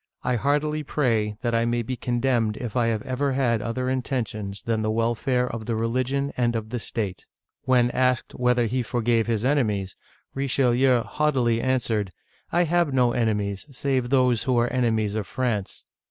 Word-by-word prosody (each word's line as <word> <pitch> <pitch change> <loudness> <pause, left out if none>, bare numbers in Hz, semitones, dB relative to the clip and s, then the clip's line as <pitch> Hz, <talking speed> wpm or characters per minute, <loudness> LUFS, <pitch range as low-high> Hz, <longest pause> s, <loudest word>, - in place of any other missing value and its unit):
I 125 - +1
heartily 150 +5 0
pray 115 -8 0
that 120 -1 0
I 115 0 +2
may 120 0 0
be 130 +3 -3
condemned 120 -3 0
if 120 -4 -6
I 120 -2 +2
have 110 -2 -1
ever 135 +2 -1
had 120 -4 +1
other 125 +3 -2
intentions 115 -6 -3
than 115 -1 0
the 110 - 0
welfare 120 +3 0
of 115 -3 -6
the 115 - 0
religion 130 +5 -1
and 120 -1 +1
of 110 -1 -4
the 125 - -2
state." 105 -4 -4 0.4
When 125 -2 +3
asked 125 -1 +1
whether 125 -1 +2
he 125 +3 0
forgave 115 -1 0
his 115 0 0
enemies, 105 -9 0 0.4
Richelieu 130 -2 +2
haughtily 130 -7 +1
answered, 115 -6 0 0.2
" - - -37
I 175 +1 +3
have 170 -2 +1
no 125 -2 +3
enemies, 105 -2 -1
save 130 -2 -1
those 125 -4 +2
who 130 -2 +2
are 120 +1 +2
enemies 110 -5 +1
of 110 -2 -3
France! 115 -7 -3
120 Hz, 175 wpm, -25 LUFS, 115-130 Hz, 0.4 s, When